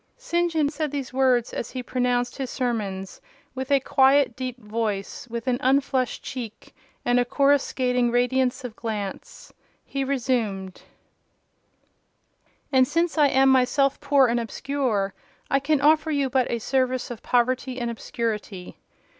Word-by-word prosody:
'" -, -, -44 dB
St. 345 Hz, 0 st, +2 dB
John 310 Hz, -3 st, +2 dB
said 305 Hz, 0 st, -3 dB
these 275 Hz, -3 st, -5 dB
words 255 Hz, -3 st, +2 dB
as 235 Hz, -, -4 dB
he 255 Hz, -1 st, -5 dB
pronounced 245 Hz, 0 st, 0 dB
his 265 Hz, -3 st, -4 dB
sermons, 210 Hz, -8 st, -3 dB, 0.3 s
with 260 Hz, +1 st, -5 dB
a 280 Hz, -1 st, +4 dB
quiet, 270 Hz, -1 st, +3 dB
deep 255 Hz, -1 st, -5 dB
voice; 210 Hz, -1 st, -3 dB
with 230 Hz, 0 st, -5 dB
an 250 Hz, -1 st, 0 dB
unflushed 265 Hz, -1 st, +1 dB
cheek, 230 Hz, -4 st, -7 dB, 0.3 s
and 245 Hz, 0 st, +3 dB
a -, -, +4 dB
coruscating 255 Hz, -2 st, +2 dB
radiance 250 Hz, +2 st, +1 dB
of 240 Hz, -3 st, -7 dB
glance. 210 Hz, -4 st, -6 dB, 0.3 s
He 275 Hz, -1 st, -3 dB
resumed— 230 Hz, -8 st, -2 dB, 1.9 s
"And 260 Hz, -2 st, +4 dB
since 330 Hz, +2 st, 0 dB
I 295 Hz, -, +6 dB
am 270 Hz, 0 st, +4 dB
myself 265 Hz, +1 st, +3 dB
poor 280 Hz, -2 st, +4 dB
and 240 Hz, 0 st, +1 dB
obscure, 235 Hz, -5 st, -2 dB, 0.4 s
I 275 Hz, -, +4 dB
can 295 Hz, +2 st, +1 dB
offer 310 Hz, +2 st, +4 dB
you 280 Hz, -4 st, 0 dB
but 260 Hz, -1 st, +2 dB
a 235 Hz, -, 0 dB
service 255 Hz, +1 st, -1 dB
of 235 Hz, -2 st, -7 dB
poverty 255 Hz, +1 st, 0 dB
and 240 Hz, -1 st, -2 dB
obscurity. 215 Hz, -5 st, -5 dB
255 Hz, 145 wpm, -24 LUFS, 235-275 Hz, 1.9 s, I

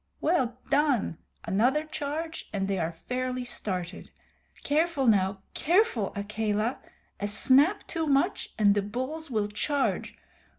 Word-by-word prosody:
"Well 260 Hz, -8 st, +1 dB
done! 280 Hz, -, +2 dB, 0.3 s
Another 250 Hz, +10 st, +2 dB
charge 310 Hz, +1 st, -5 dB
and 195 Hz, -2 st, -1 dB
they 195 Hz, -1 st, 0 dB
are 165 Hz, 0 st, -1 dB
fairly 250 Hz, +8 st, -3 dB
started. 185 Hz, -7 st, -4 dB, 0.5 s
Careful, 300 Hz, -1 st, +1 dB
now 195 Hz, -3 st, +2 dB
careful, 335 Hz, -, +2 dB
Akela. 215 Hz, +3 st, -1 dB, 0.4 s
A 205 Hz, -, -1 dB
snap 270 Hz, -, +4 dB
too 325 Hz, -2 st, -2 dB
much 285 Hz, +7 st, +1 dB
and 205 Hz, -2 st, +5 dB
the 205 Hz, -, +1 dB
bulls 260 Hz, +10 st, -4 dB
will 215 Hz, -4 st, 0 dB
charge. 275 Hz, +7 st, -1 dB
250 Hz, 125 wpm, -28 LUFS, 205-300 Hz, 0.5 s, and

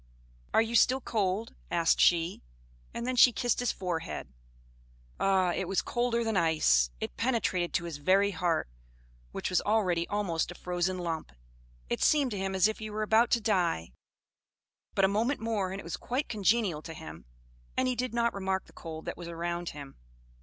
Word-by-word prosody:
"Are 225 Hz, -, +4 dB
you 225 Hz, +1 st, -5 dB
still 255 Hz, +3 st, +4 dB
cold?" 215 Hz, -2 st, -1 dB, 0.2 s
asked 170 Hz, -1 st, +2 dB
she; 170 Hz, 0 st, +3 dB, 0.5 s
and 235 Hz, -, -5 dB
then 255 Hz, 0 st, -1 dB
she 250 Hz, 0 st, +8 dB
kissed 240 Hz, 0 st, 0 dB
his 245 Hz, -2 st, +1 dB
forehead. 165 Hz, -, -4 dB, 0.9 s
Ah! 190 Hz, -2 st, +3 dB
it 190 Hz, -, -2 dB
was 195 Hz, +1 st, 0 dB
colder 240 Hz, -1 st, 0 dB
than 225 Hz, -2 st, -1 dB
ice; 155 Hz, -, +3 dB
it -, -, -5 dB
penetrated 225 Hz, -8 st, 0 dB
to 175 Hz, -, +1 dB
his 170 Hz, -4 st, -5 dB
very 195 Hz, +7 st, +3 dB
heart, 170 Hz, -, 0 dB, 0.6 s
which -, -, -3 dB
was 180 Hz, -, +3 dB
already 185 Hz, -6 st, +1 dB
almost 195 Hz, -6 st, -1 dB
a 175 Hz, -, -7 dB
frozen 180 Hz, +1 st, -1 dB
lump; 165 Hz, -, -4 dB, 0.6 s
it -, -, -2 dB
seemed 285 Hz, -4 st, +3 dB
to 205 Hz, -, -3 dB
him 195 Hz, 0 st, -2 dB
as 190 Hz, +2 st, +5 dB
if 220 Hz, -, -4 dB
he 215 Hz, 0 st, -5 dB
were 215 Hz, +1 st, -2 dB
about 225 Hz, +2 st, +4 dB
to 235 Hz, -, +3 dB
die 175 Hz, -, 0 dB, 1.0 s
but 195 Hz, -, +4 dB
a -, -, +5 dB
moment 225 Hz, +8 st, 0 dB
more 215 Hz, -5 st, -1 dB
and 195 Hz, -, -5 dB
it -, -, -8 dB
was 170 Hz, -, -5 dB
quite 255 Hz, +4 st, -2 dB
congenial 205 Hz, -6 st, +1 dB
to 165 Hz, 0 st, -8 dB
him, 75 Hz, -, -10 dB, 0.5 s
and 255 Hz, -, +2 dB
he 255 Hz, -, 0 dB
did 250 Hz, +1 st, -2 dB
not 235 Hz, 0 st, +1 dB
remark 190 Hz, -1 st, -2 dB
the -, -, -20 dB
cold 160 Hz, -1 st, -8 dB
that -, -, -5 dB
was 175 Hz, -, -8 dB
around 170 Hz, +1 st, -3 dB
him. 140 Hz, -2 st, -10 dB
190 Hz, 190 wpm, -30 LUFS, 170-225 Hz, 1.0 s, she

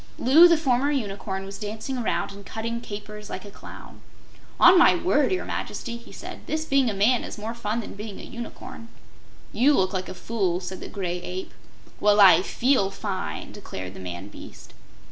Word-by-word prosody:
Loo 310 Hz, +8 st, +7 dB
the 335 Hz, -1 st, +4 dB
former 270 Hz, -2 st, +1 dB
Unicorn 200 Hz, -7 st, -3 dB
was 195 Hz, 0 st, -8 dB
dancing 220 Hz, +5 st, -5 dB
around 220 Hz, -5 st, -1 dB
and 200 Hz, 0 st, -11 dB
cutting 230 Hz, +3 st, -4 dB
capers 210 Hz, -1 st, -8 dB
like 185 Hz, -, -6 dB
a 205 Hz, -, -10 dB
clown. -, -, -12 dB, 0.6 s
"On 355 Hz, +2 st, +8 dB
my 350 Hz, 0 st, +7 dB
word, 340 Hz, -4 st, +2 dB
your 375 Hz, -, -1 dB
Majesty," 235 Hz, -2 st, -4 dB
he 235 Hz, 0 st, -12 dB
said, -, -, -8 dB
"this 315 Hz, 0 st, -2 dB
being 275 Hz, -4 st, +3 dB
a -, -, -2 dB
man 225 Hz, +5 st, +3 dB
is -, -, -7 dB
more 220 Hz, +2 st, -5 dB
fun 235 Hz, 0 st, -2 dB
than -, -, -8 dB
being 205 Hz, 0 st, -8 dB
a -, -, -9 dB
Unicorn." 230 Hz, -1 st, -9 dB, 0.7 s
"You 275 Hz, +5 st, +4 dB
look 185 Hz, -3 st, +1 dB
like 185 Hz, -1 st, -3 dB
a -, -, -7 dB
fool," 190 Hz, -6 st, -1 dB
said 185 Hz, 0 st, -6 dB
the -, -, -7 dB
Gray 180 Hz, -3 st, -3 dB
Ape. 185 Hz, +1 st, -6 dB, 0.5 s
"Well, 210 Hz, 0 st, +4 dB
I 185 Hz, -4 st, +8 dB
FEEL 235 Hz, 0 st, +1 dB
fine!" 195 Hz, -1 st, -5 dB
declared 95 Hz, -, -8 dB
the -, -, -10 dB
man 90 Hz, +2 st, -7 dB
beast. -, -, -12 dB
210 Hz, 190 wpm, -25 LUFS, 195-250 Hz, 0.7 s, On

